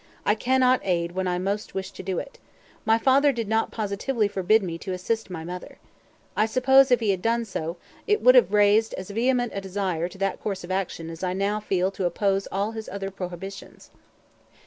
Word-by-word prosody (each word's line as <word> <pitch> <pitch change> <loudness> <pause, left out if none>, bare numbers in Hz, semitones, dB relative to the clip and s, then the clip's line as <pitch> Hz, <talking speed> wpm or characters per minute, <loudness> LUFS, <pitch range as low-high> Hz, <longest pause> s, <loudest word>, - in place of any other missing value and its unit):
I 210 - +4
cannot 255 +3 +3
aid 170 -2 0
when 185 +1 -2
I 180 0 0
most 200 +3 -3
wish 190 0 -4
to - - -9
do 190 -2 -3
it. 280 - -6 0.5
My 225 0 +4
father 275 +4 +4
did 230 -4 -3
not 220 +1 +1
positively 215 +2 -1
forbid 205 +2 +2
me 165 -2 -4
to 190 - -5
assist 220 +4 -2
my 165 -3 -6
mother. 180 +2 -8 0.6
I 215 - +2
suppose, 265 +3 +5
if 245 -1 +3
he 215 -3 +2
had 190 -2 -2
done 230 +2 +1
so, 170 -4 -4 0.3
it 420 0 +3
would - - +7
have - - +5
raised 210 +2 +4
as 185 +2 -7
vehement 245 +2 +1
a 195 - -3
desire 185 -3 -2
to 195 - -13
that 195 -1 -2
course 195 -3 -3
of 175 - -7
action 175 -3 -3
as 165 +2 -9
I 180 -1 0
now 200 +2 0
feel 190 -2 0
to 195 - -3
oppose 195 +2 0
all 200 +3 -1
his 220 -1 -7
other 195 0 -5
prohibitions." 190 +1 -8
200 Hz, 210 wpm, -25 LUFS, 185-225 Hz, 0.6 s, would